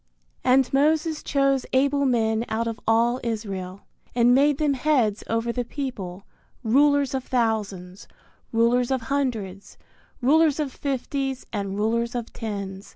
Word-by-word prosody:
And 260 +1 +3
Moses 310 +2 +2
chose 275 -2 +1
able 280 +2 +2
men 225 -2 +1
out 225 +1 -1
of 225 -1 -4
all 235 +2 +3
Israel, 200 -5 -4 0.3
and 240 0 +5
made 280 +2 +4
them 295 -2 +1
heads 255 -7 +1
over 230 +1 -1
the 245 +1 -2
people, 210 -9 -6 0.4
rulers 280 +3 +3
of 265 -1 -2
thousands, 205 -7 -2 0.4
rulers 235 +2 +2
of 265 -2 0
hundreds, 215 -9 -3 0.4
rulers 305 +3 +3
of 285 -4 -2
fifties, 270 -1 -3
and 200 -2 -3
rulers 230 +3 0
of 235 -2 -5
tens. 200 -3 -6
240 Hz, 135 wpm, -24 LUFS, 220-275 Hz, 0.4 s, and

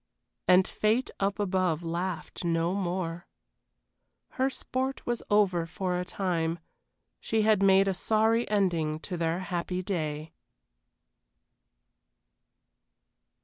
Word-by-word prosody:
And 185 +1 +6
fate 220 +4 0
up 200 0 0
above 185 -5 0
laughed 175 +2 -4
no 170 +1 +1
more. 175 -3 -3 1.0
Her 265 -1 0
sport 265 0 -3
was 240 -1 -1
over 190 -5 +3
for 180 +1 -2
a - - -1
time, 170 -3 -1 0.6
she 220 -1 0
had 215 -2 +4
made 195 0 +5
a 195 - +2
sorry 220 +5 +2
ending 170 -7 +1
to 180 - -5
their 170 +1 -1
happy 180 0 -3
day. 155 -4 -3
185 Hz, 105 wpm, -28 LUFS, 170-205 Hz, 1.0 s, And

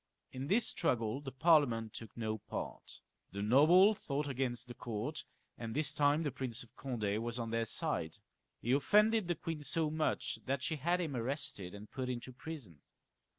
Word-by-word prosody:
In 130 +1 -5
this 220 +8 +3
struggle 115 +2 0
the 135 -2 -6
Parliament 130 -7 +3
took 115 0 -8
no 110 -1 -2
part. 105 - -6 0.3
The 100 0 -3
nobles 170 - +6
fought 145 +1 -2
against 125 -3 -2
the 120 - -7
court, 120 +5 -4 0.3
and 115 -1 -5
this 145 -2 +3
time 145 +2 +3
the 145 - -1
Prince 125 -2 -3
of 120 +1 -20
Conde 110 -5 -2
was 120 +1 -2
on 115 -2 -3
their 115 0 +1
side. 115 - -1 0.5
He 120 - 0
offended 210 - +4
the 175 - +1
queen 160 0 -4
so 150 +2 +1
much 155 0 -1
that 135 0 0
she 160 - -1
had 175 +5 +1
him 155 -6 -3
arrested 115 -7 -2
and 105 +1 -11
put 130 -1 -3
into 125 +1 -5
prison. 125 - -8
130 Hz, 180 wpm, -35 LUFS, 115-155 Hz, 0.5 s, nobles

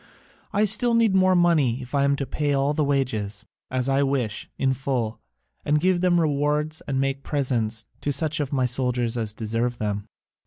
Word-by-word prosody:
I 210 0 +2
still 230 +3 +4
need 230 -3 +3
more 185 -1 +4
money 155 -9 +3
if 125 - -13
I 140 -1 +2
am 140 0 +2
to 140 - -3
pay 145 +2 -1
all 140 +2 +1
the 150 - 0
wages, 110 -7 -1 0.2
as 130 0 -1
I 135 +1 +2
wish, 135 -6 -1
in 135 -1 +1
full, 125 -4 -2 0.4
and 150 +1 +2
give 180 +1 +1
rewards 155 -3 +1
and 135 -2 -1
make 135 0 -1
presents 115 -7 -1 0.2
to 145 - -1
such 155 +2 0
of 145 -3 -2
my 130 -3 +1
soldiers 125 -1 0
as 110 -3 -1
deserve 115 +3 -2
them. 105 -1 -3
135 Hz, 185 wpm, -24 LUFS, 120-150 Hz, 0.4 s, still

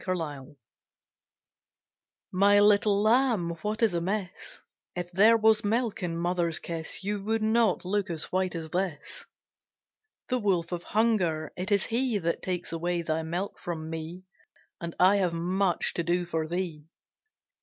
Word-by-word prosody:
THE 185 - -1
STARVED 145 -4 -6 1.8
My 200 +2 +5
little 205 0 +4
Lamb, 225 -6 +3
what 215 +4 -2
is 220 -5 +3
amiss? 185 +2 -3 0.4
If 175 0 -4
there 215 +5 +6
was 220 -1 +4
milk 225 +1 0
in 170 -2 -2
mother's 170 -1 0
kiss, 165 +2 -5
You 205 0 -2
would 220 0 0
not 220 -4 +2
look 200 +1 -1
as 160 -2 -3
white 185 -1 0
as 160 -1 -6
this. 180 -5 -4 1.0
The 255 -1 +1
wolf 185 -6 0
of 175 -1 -3
Hunger, 180 -9 0
it 185 +4 -4
is 200 -1 +3
he 240 -1 0
That 170 -3 -2
takes 180 -1 -3
away 170 +1 -1
thy 160 0 -1
milk 175 +5 -4
from 160 -2 -5
me, 165 +3 -6 0.6
And 170 -1 -5
I 190 +3 +6
have 180 -4 +1
much 180 +2 +1
to - - -1
do 175 +1 0
for 160 -2 -2
thee. 165 -3 -4
180 Hz, 155 wpm, -28 LUFS, 170-205 Hz, 1.8 s, there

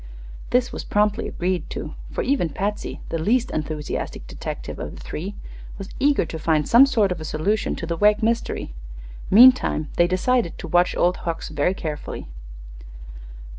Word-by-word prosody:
This 250 0 +2
was - - -5
promptly 210 +2 +1
agreed 180 0 -2
to, - - -6 0.2
for - - -2
even 260 - +1
Patsy, 205 +7 -4
the 165 - -2
least 230 +9 +1
enthusiastic 155 -1 -4
detective - - -6
of - - -6
the - - -11
three, 195 +6 -6 0.4
was 195 0 -7
eager 285 -7 +3
to 160 - -6
find 155 -1 +1
some 250 +4 +7
sort 215 -8 +2
of 175 -3 -3
a - - -5
solution 160 +8 -1
of - - -3
the 170 - -1
Wegg 210 +4 +3
mystery. 230 - -1 0.6
Meantime 235 - +6
they 175 - +5
decided 185 +2 +1
to - - -7
watch 175 +1 +2
Old 180 +1 +2
Hucks 165 -1 -4
very 155 +5 0
carefully. 150 -4 -5
185 Hz, 165 wpm, -23 LUFS, 165-225 Hz, 0.6 s, some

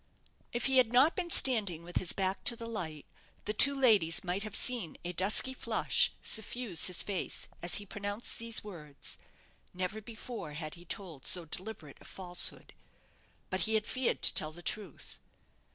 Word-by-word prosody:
If 240 - -3
he 265 -1 +2
had 245 -3 +5
not 265 +7 +3
been 355 -2 -4
standing 210 - +4
with 175 +1 -5
his 180 - +2
back 190 0 -2
to 240 - +4
the 230 - -9
light, 165 -10 -6 0.4
the 210 - -2
two 275 +5 +6
ladies 205 -11 +4
might 185 +2 -3
have 215 0 -5
seen 235 -11 +2
a 175 - -4
dusky 200 +8 +4
flush - - 0
suffuse 220 -4 0
his 180 -2 +1
face 195 -3 -4
as 175 - +2
he 205 - -2
pronounced 205 +3 -4
these 230 -1 0
words. 155 -9 -6 0.6
Never 185 +4 -5
before 220 -6 -8
had 155 0 -7
he 175 +1 -13
told 170 -6 -4
so 175 -2 +4
deliberate 170 -3 -7
a - - -15
falsehood. 180 -2 -2 0.8
But 185 - -2
he 220 - 0
had 215 -1 0
feared 255 +1 -2
to - - +6
tell 155 - +3
the 175 +2 -13
truth. 200 -7 -6
200 Hz, 175 wpm, -30 LUFS, 175-230 Hz, 0.8 s, two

